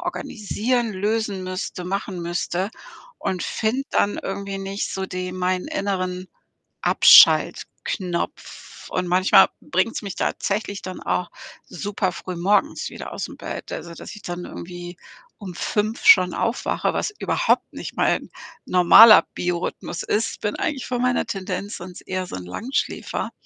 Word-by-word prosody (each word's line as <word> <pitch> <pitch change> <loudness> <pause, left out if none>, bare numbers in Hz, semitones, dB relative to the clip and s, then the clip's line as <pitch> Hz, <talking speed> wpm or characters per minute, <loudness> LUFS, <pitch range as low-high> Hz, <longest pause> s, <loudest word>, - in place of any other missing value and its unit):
organisieren, 240 - -2
lösen 205 -1 -1
müsste, 185 -1 -5
machen 190 0 -3
müsste 175 +3 -2 0.5
und 180 -2 -2
finde 225 +5 -1
dann 205 - +1
irgendwie 195 0 -4
nicht 195 +1 -4
so 190 - -3
den 185 0 -5
meinen 185 0 -1
inneren 185 -2 -2 0.6
Abschaltknopf 180 -3 +3
und 185 -1 -1
manchmal 185 +2 +6
bringt's 185 +6 -1
mich 200 -3 -6
tatsächlich 200 0 -2
dann 185 0 -7
auch 180 - -1 0.3
super 195 +2 -3
früh 180 +1 -7
morgens 195 +4 +1
wieder - - -8
ausm - - -5
Bett, - - -7
also, 170 -1 -6
dass - - -9
ich 210 - -11
dann 175 0 -5
irgendwie 175 0 -8 0.4
um 190 -4 -8
5:00 215 +5 -2
schon 455 0 +7
aufwache, - - -1
was 420 - -2
überhaupt - - +1
nicht - - -7
mein - - +1 0.4
normaler 185 +5 +8
Biorhythmus 175 -1 -3
ist. 220 +2 -1
Bin 210 - -1
eigentlich 295 -6 -2
von 245 -1 -2
meiner 250 0 +1
Tendenz 200 0 -4
sonst 180 0 -10
eher 185 -1 -3
so - - -7
'n 90 - -7
Langschläfer. 230 - -3
190 Hz, 140 wpm, -23 LUFS, 180-210 Hz, 0.6 s, normaler